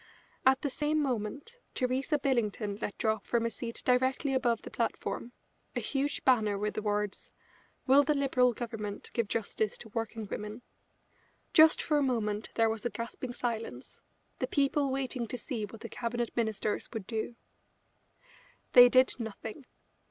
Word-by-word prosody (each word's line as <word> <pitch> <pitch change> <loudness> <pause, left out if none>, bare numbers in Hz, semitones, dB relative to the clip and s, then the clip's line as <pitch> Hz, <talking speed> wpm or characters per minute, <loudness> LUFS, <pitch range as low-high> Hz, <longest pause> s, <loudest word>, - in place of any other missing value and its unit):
At 265 +1 +5
the 285 - +1
same 300 +3 0
moment 275 - -3 0.2
Theresa 260 +4 +1
Billington 215 -6 0
let 205 - -3
drop 220 -2 0
from 235 -1 +1
a 230 - 0
seat 230 +2 -6
directly 260 +2 +2
above 240 -3 +1
the - - -8
platform 235 +1 -2 0.4
a - - +1
huge 280 +1 -2
banner 220 -6 +4
with 210 +1 -1
the - - -3
words: 210 -1 -2 0.5
"Will 275 +2 +7
the 295 +1 +1
Liberal 260 -3 +3
Government 220 -3 -5
give 235 -3 0
justice 215 -1 -1
to 220 - -10
working 225 0 -3
women?" 210 +4 -6 0.9
Just 315 0 +7
for 300 -2 +2
a - - +1
moment 220 -5 0
there 225 -1 +4
was 220 -1 -2
a 240 - 0
gasping 235 +3 -6
silence, 225 - -4 0.4
the - - 0
people 280 0 +2
waiting 260 -2 -2
to 250 - -4
see 235 -5 -4
what 225 +2 -12
the - - -5
Cabinet 240 0 -3
Ministers 220 -2 -1
would 220 -5 -5
do. 225 +1 -3 1.4
They 245 0 +10
did 255 +1 +5
nothing. 225 +4 -6
235 Hz, 160 wpm, -31 LUFS, 220-265 Hz, 1.4 s, They